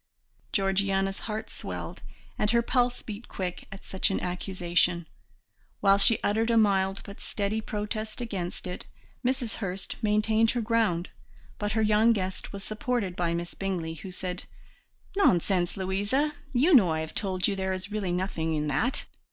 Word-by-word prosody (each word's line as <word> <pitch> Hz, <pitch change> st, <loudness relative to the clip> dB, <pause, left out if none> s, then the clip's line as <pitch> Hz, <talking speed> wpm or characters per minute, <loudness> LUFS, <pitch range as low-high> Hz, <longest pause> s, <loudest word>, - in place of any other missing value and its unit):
Georgiana's 195 Hz, -1 st, +1 dB
heart 215 Hz, +1 st, -3 dB
swelled, -, -, -6 dB, 0.4 s
and 210 Hz, -, +2 dB
her 235 Hz, +1 st, +4 dB
pulse 245 Hz, 0 st, +1 dB
beat 215 Hz, +1 st, -7 dB
quick 180 Hz, -2 st, -4 dB
at 195 Hz, -, -10 dB
such 190 Hz, +3 st, 0 dB
an 195 Hz, -, 0 dB
accusation, 175 Hz, -1 st, 0 dB, 0.7 s
while 195 Hz, 0 st, +5 dB
she 200 Hz, +3 st, +6 dB
uttered 225 Hz, +3 st, +2 dB
a 230 Hz, -, +4 dB
mild 195 Hz, -2 st, +3 dB
but 200 Hz, -, -10 dB
steady 210 Hz, +1 st, -1 dB
protest 215 Hz, +1 st, -4 dB
against 195 Hz, -8 st, -4 dB
it. 180 Hz, 0 st, -6 dB, 0.4 s
Mrs. 255 Hz, -2 st, 0 dB
Hurst 190 Hz, -2 st, -3 dB
maintained 215 Hz, +1 st, +3 dB
her 240 Hz, -, +1 dB
ground, 215 Hz, -6 st, +1 dB, 0.5 s
but 205 Hz, 0 st, -1 dB
her 220 Hz, 0 st, +2 dB
young 215 Hz, +2 st, +5 dB
guest 190 Hz, -3 st, -3 dB
was 200 Hz, -1 st, -6 dB
supported 215 Hz, -3 st, -1 dB
by 170 Hz, -1 st, 0 dB
Miss 170 Hz, 0 st, -4 dB
Bingley, 180 Hz, -4 st, -2 dB
who 175 Hz, +4 st, -8 dB
said: 180 Hz, 0 st, -4 dB, 0.7 s
"Nonsense, 180 Hz, -, +3 dB
Louisa, 205 Hz, +11 st, +1 dB, 0.2 s
you 280 Hz, +8 st, +4 dB
know 215 Hz, -, +7 dB
I 160 Hz, 0 st, 0 dB
have 160 Hz, -, -6 dB
told 185 Hz, -3 st, 0 dB
you 200 Hz, -, 0 dB
there 190 Hz, 0 st, -1 dB
is 190 Hz, +2 st, -4 dB
really 205 Hz, -4 st, -1 dB
nothing 175 Hz, -3 st, -1 dB
in 150 Hz, 0 st, 0 dB
that. 220 Hz, -, +1 dB
195 Hz, 160 wpm, -28 LUFS, 185-220 Hz, 0.7 s, know